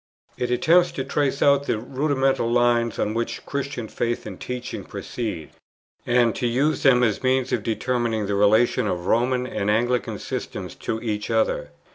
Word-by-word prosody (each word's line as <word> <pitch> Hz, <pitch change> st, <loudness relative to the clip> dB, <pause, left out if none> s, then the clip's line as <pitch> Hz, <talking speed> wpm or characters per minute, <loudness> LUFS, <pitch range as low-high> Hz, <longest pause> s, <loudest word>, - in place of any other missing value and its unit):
It 125 Hz, -, -2 dB
attempts 170 Hz, +8 st, +4 dB
to 135 Hz, -, -3 dB
trace 140 Hz, 0 st, 0 dB
out 140 Hz, 0 st, +4 dB
the -, -, +1 dB
rudimental 135 Hz, 0 st, 0 dB
lines 120 Hz, -1 st, +2 dB
on 105 Hz, -, -1 dB
which 115 Hz, +1 st, -3 dB
Christian 140 Hz, -4 st, -4 dB
faith 120 Hz, +2 st, -2 dB
and 95 Hz, -4 st, -8 dB
teaching 125 Hz, 0 st, -5 dB
proceed, 105 Hz, -10 st, -5 dB, 0.6 s
and 120 Hz, -2 st, +3 dB
to 120 Hz, -, 0 dB
use 135 Hz, +6 st, +1 dB
them 125 Hz, -3 st, +5 dB
as 110 Hz, -4 st, +1 dB
means 130 Hz, 0 st, +1 dB
of 115 Hz, -, +1 dB
determining 115 Hz, 0 st, -1 dB
the 100 Hz, -, -2 dB
relation 110 Hz, +4 st, +3 dB
of 90 Hz, -, 0 dB
the 85 Hz, +1 st, -8 dB
Roman 125 Hz, +2 st, +2 dB
and 105 Hz, -5 st, -2 dB
Anglican 120 Hz, +3 st, +1 dB
systems -, -, -5 dB
to 110 Hz, -, -4 dB
each 105 Hz, -2 st, -3 dB
other. 110 Hz, -9 st, 0 dB
120 Hz, 170 wpm, -23 LUFS, 110-130 Hz, 0.6 s, them